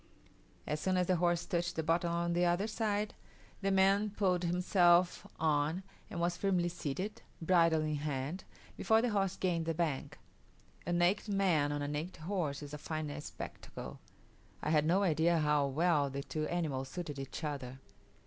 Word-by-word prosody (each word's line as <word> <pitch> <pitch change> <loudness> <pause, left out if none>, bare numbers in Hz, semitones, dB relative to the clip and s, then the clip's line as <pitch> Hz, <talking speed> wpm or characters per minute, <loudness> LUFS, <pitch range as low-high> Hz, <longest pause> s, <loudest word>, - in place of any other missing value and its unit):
As 150 - -2
soon 185 +3 +1
as 180 - +2
the 185 0 +2
horse 175 0 +1
touched 175 -2 -1
the 160 - -1
bottom 170 +2 +1
on 170 0 0
the 175 +1 +2
other 175 +3 +2
side, 215 -1 -1 0.5
the 195 - +1
man 195 +2 +4
pulled 190 -3 +1
himself 175 0 +3
on, 155 +3 +1 0.3
and 170 - -5
was 175 0 +1
firmly 180 -3 +1
seated, 175 +5 -4 0.2
bridle 165 -2 +3
in 155 -1 -1
hand, 145 +4 -3 0.3
before 220 +1 +3
the 245 - +1
horse 195 -2 +1
gained 170 -3 0
the 165 - 0
bank. 160 -5 -2 0.7
A - - 0
naked 175 +5 +2
man 175 -7 +2
on 145 0 -2
a - - -2
naked 155 +3 -5
horse 155 -6 -2
is 145 0 -9
a 150 - -5
fine 155 -1 -4
spectacle; - - -8 0.6
I - - 0
had 155 -1 +3
no 190 +4 +3
idea 165 -1 +3
how 150 -2 +2
well 150 0 +2
the 140 +1 -4
two 155 +1 -3
animals 145 -7 -2
suited 150 -3 -5
each 135 +4 -6
other. 135 -4 -4
170 Hz, 175 wpm, -33 LUFS, 150-185 Hz, 0.7 s, man